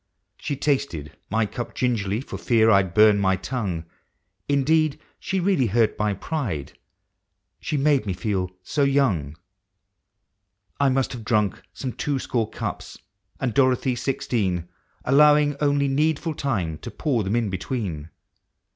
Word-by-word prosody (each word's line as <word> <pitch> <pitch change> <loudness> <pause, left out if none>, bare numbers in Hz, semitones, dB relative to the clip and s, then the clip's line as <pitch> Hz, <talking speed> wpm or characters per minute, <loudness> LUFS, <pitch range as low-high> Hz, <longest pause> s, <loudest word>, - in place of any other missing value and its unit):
She 145 - -3
tasted 130 - -1
my 110 +1 +1
cup 120 +3 -6
gingerly, 110 -4 0
for - - -7
fear 110 -2 +4
I'd 95 -4 +3
burn 105 -1 +6
my 95 -1 +3
tongue; 95 -4 -3 0.6
Indeed, 155 +2 +2 0.2
she 190 - -2
really 180 -9 +2
hurt 110 +1 +2
my 105 -1 +1
pride 100 - -4 0.4
— - - -54
she 150 - -2
made 140 -5 +2
me 95 - 0
feel 95 -2 -2
so 145 - -1
young. 115 - +1 1.4
I 140 -1 +4
must 130 0 0
have 120 -3 -7
drunk 105 -3 +1
some 130 -3 -5
twoscore 130 -6 -1
cups, - - -5 0.4
and 130 -4 -1
Doro 130 +1 +4
thy 130 +1 -1
sixteen, 120 -5 -1
•18 - - -1
POEMS 85 - -4
OF - - -24 0.4
HOME, 130 - +1
Allowing 150 0 +5
only 145 -1 +2
needful 155 +3 0
time 95 - -2
to - - -7
pour 130 -8 -1
them 100 +4 -1
in 115 -4 0
be 95 - -3
tween. 90 - -4
120 Hz, 155 wpm, -24 LUFS, 100-140 Hz, 1.4 s, burn